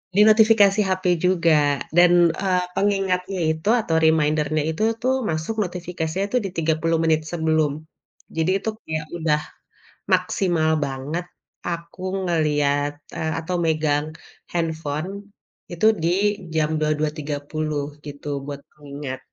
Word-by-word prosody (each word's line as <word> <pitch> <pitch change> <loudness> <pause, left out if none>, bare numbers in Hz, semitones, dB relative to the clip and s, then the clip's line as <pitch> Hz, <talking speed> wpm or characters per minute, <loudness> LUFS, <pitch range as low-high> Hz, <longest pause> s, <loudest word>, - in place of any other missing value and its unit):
di 205 - +6
notifikasi 215 -2 +5
HP 185 0 -1 0.2
juga 160 -6 +3 0.2
dan, 175 0 +7 0.2
eee, 180 +1 0
pengingatnya 195 -2 0
itu 160 +6 -3
atau 165 -6 -1
reminder-nya 155 -1 +2
itu 160 +7 -2 0.2
tuh, 260 +2 +2
masuk 160 +8 -2
notifikasinya 180 0 -3
tuh - - +1
di 195 - -2
30 165 0 +1
menit 160 -1 +3
sebelum. 160 -3 +1 0.6
Jadi 160 +3 +2
itu - - -2 0.2
kayak 155 -1 -3
udah 155 -2 +1 0.7
maksimal 170 -5 +1 0.2
banget, 140 +6 -4 0.4
aku 170 +1 -5 0.3
ngelihat, 145 -3 +1 0.2
eee, 160 0 -1
atau 170 +3 -3
megang 155 -2 +1 0.5
handphone 160 -1 -2 0.6
itu 175 +5 -1 0.2
di 170 - +2 0.4
jam 155 -1 +1
22.30 150 -1 -2 0.2
gitu 145 0 -9 0.2
buat 140 0 -6 0.2
pengingat. 140 -2 -7
160 Hz, 120 wpm, -23 LUFS, 150-180 Hz, 0.7 s, dan